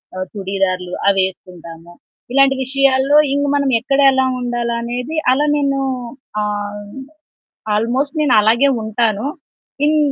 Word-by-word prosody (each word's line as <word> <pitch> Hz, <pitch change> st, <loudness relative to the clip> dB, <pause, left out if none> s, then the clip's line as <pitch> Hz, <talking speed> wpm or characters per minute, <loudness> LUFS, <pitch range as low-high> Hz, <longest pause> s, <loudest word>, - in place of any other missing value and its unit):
ఆహ్, 185 Hz, 0 st, -4 dB
చుడిదార్లు 190 Hz, -2 st, -2 dB, 0.2 s
అవేసుకుంటాము. 175 Hz, -3 st, -5 dB, 0.4 s
ఇలాంటి 275 Hz, 0 st, +4 dB
విషయాల్లో 275 Hz, +1 st, +2 dB, 0.2 s
ఇంక 285 Hz, 0 st, 0 dB
మనం 280 Hz, -1 st, +1 dB
ఎక్కడ 275 Hz, +4 st, -1 dB
ఎలా 265 Hz, 0 st, +2 dB, 0.2 s
ఉండాలనేది 240 Hz, +3 st, -3 dB, 0.2 s
అలా 280 Hz, +3 st, +2 dB
నేను 275 Hz, -1 st, 0 dB, 0.6 s
ఆహ్, 205 Hz, 0 st, -4 dB, 0.9 s
ఆల్మోస్ట్ 250 Hz, +8 st, -1 dB
నేను 290 Hz, -4 st, +2 dB
అలాగే 235 Hz, +6 st, +3 dB, 0.2 s
ఉంటాను. 220 Hz, 0 st, -1 dB, 0.6 s
ఇన్ 305 Hz, +1 st, +2 dB
235 Hz, 105 wpm, -17 LUFS, 200-275 Hz, 0.9 s, ఇలాంటి